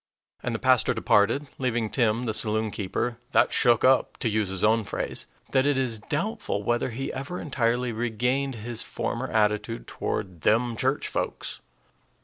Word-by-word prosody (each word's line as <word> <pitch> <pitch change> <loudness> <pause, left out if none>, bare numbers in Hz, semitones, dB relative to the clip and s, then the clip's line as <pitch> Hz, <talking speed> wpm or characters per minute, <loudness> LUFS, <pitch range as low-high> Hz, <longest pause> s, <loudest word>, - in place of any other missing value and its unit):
And - - -2
the - - +1
pastor - - +3
departed, 115 +8 +3
leaving 120 -3 0
Tim, 120 -1 +1
the 110 - 0
saloonkeeper, 110 +1 -1 0.2
"that - - +4
shook 120 -3 +4
up," 130 0 +3
to 115 - 0
use 105 -2 0
his 95 -1 -3
own 110 +1 +4
phrase, - - -3 0.2
that 135 +1 +3
it 145 -2 +2
is 120 -4 0
doubtful 155 - -2
whether 120 +4 0
he 130 +3 -4
ever 140 +7 -5
entirely 125 -3 0
regained 125 +4 -1
his 115 +1 -4
former 125 +3 -3
attitude 105 - 0
toward 95 -5 -4
"them 115 +2 +2
church 130 +5 0
folks." - - -4
120 Hz, 155 wpm, -26 LUFS, 110-130 Hz, 0.2 s, that